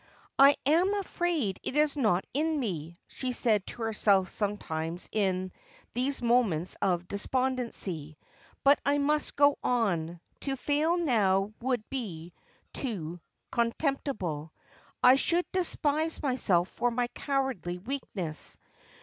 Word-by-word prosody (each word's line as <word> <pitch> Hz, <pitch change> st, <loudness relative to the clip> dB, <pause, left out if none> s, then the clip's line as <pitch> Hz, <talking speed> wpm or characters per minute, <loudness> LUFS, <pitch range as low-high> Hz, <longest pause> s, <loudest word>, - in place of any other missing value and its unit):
' -, -, -33 dB
I 285 Hz, -, +3 dB
am 350 Hz, +8 st, +3 dB
afraid 345 Hz, -, -1 dB
it -, -, -4 dB
is 300 Hz, -1 st, +3 dB
not 215 Hz, -10 st, +2 dB
in 310 Hz, +2 st, +1 dB
nie,! 170 Hz, -, -4 dB
she 255 Hz, -1 st, -4 dB
said 215 Hz, -5 st, +1 dB
to 235 Hz, -, -6 dB
herself 205 Hz, -4 st, +3 dB
sometimes 175 Hz, -5 st, -3 dB
in 185 Hz, -3 st, 0 dB, 0.4 s
these 255 Hz, +2 st, -1 dB
moments 220 Hz, -9 st, +2 dB
of 180 Hz, -2 st, +1 dB
despondency. 205 Hz, -, -2 dB, 0.2 s
' -, -, -29 dB
But 280 Hz, +1 st, +6 dB
I 285 Hz, +1 st, +2 dB
must 300 Hz, +1 st, 0 dB
go 285 Hz, 0 st, +4 dB
on. 175 Hz, -9 st, 0 dB, 0.2 s
To 275 Hz, -1 st, -2 dB
fail 300 Hz, +6 st, +1 dB
now 210 Hz, -, +2 dB
would 245 Hz, -3 st, -1 dB
be 180 Hz, -11 st, -5 dB, 0.4 s
too 175 Hz, -, -4 dB, 0.3 s
contemptible. 230 Hz, -, -1 dB, 0.5 s
I 255 Hz, +1 st, +8 dB
should 345 Hz, +5 st, +2 dB
despise 320 Hz, -3 st, 0 dB
myself 195 Hz, -10 st, +2 dB
for 245 Hz, -, 0 dB
my 245 Hz, +1 st, 0 dB
cowardly 265 Hz, -, -2 dB
weakness.' 190 Hz, -, -4 dB
235 Hz, 125 wpm, -29 LUFS, 185-280 Hz, 0.5 s, I